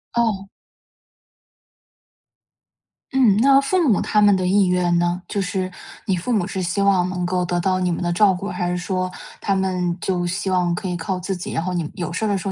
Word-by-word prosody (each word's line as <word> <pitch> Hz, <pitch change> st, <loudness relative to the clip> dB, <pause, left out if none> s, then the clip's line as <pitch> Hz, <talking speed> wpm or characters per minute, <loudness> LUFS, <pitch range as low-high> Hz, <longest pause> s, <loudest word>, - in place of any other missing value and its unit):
哦。 210 Hz, -5 st, 0 dB, 2.6 s
嗯， 255 Hz, -7 st, +4 dB
那 275 Hz, +3 st, +6 dB
父 330 Hz, +3 st, +1 dB
母 205 Hz, -, +3 dB
他 210 Hz, -, +2 dB
们 205 Hz, -1 st, +6 dB
的 185 Hz, -, -1 dB
意 195 Hz, +2 st, +3 dB
愿 180 Hz, -1 st, +2 dB
呢？ 175 Hz, +1 st, 0 dB
就 200 Hz, -, -2 dB
是 185 Hz, 0 st, -2 dB, 0.3 s
你 195 Hz, -4 st, +1 dB
父 180 Hz, +8 st, -3 dB
母 205 Hz, -6 st, +1 dB
是 190 Hz, -1 st, -4 dB
希 175 Hz, +2 st, -2 dB
望 185 Hz, -2 st, +3 dB
能 180 Hz, -1 st, -2 dB
够 180 Hz, 0 st, 0 dB
得 175 Hz, 0 st, -1 dB
到 185 Hz, +1 st, +1 dB
你 180 Hz, -1 st, 0 dB
们 175 Hz, -, -2 dB
的 175 Hz, -, 0 dB
照 200 Hz, +2 st, +5 dB
顾， 190 Hz, +3 st, -5 dB
还 175 Hz, -3 st, -2 dB
是 180 Hz, -, -1 dB
说 185 Hz, 0 st, -2 dB, 0.3 s
他 195 Hz, -, 0 dB
们 180 Hz, -2 st, -1 dB
就 175 Hz, -1 st, -1 dB
希 190 Hz, +2 st, -2 dB
望 180 Hz, -2 st, +1 dB
可 185 Hz, -, -4 dB
以 180 Hz, -, -2 dB
靠 180 Hz, +2 st, -3 dB
自 190 Hz, +2 st, -3 dB
己， 180 Hz, -, -6 dB
然 165 Hz, -, -2 dB
后 185 Hz, +1 st, -2 dB
你 175 Hz, -, 0 dB
们 155 Hz, -, -6 dB
有 175 Hz, -1 st, -4 dB
事 220 Hz, -, -1 dB
儿 -, -, +1 dB
的 200 Hz, -1 st, +1 dB
时 190 Hz, -, -5 dB
候 -, -, -1 dB
185 Hz, 245 characters per minute, -21 LUFS, 175-200 Hz, 2.6 s, 那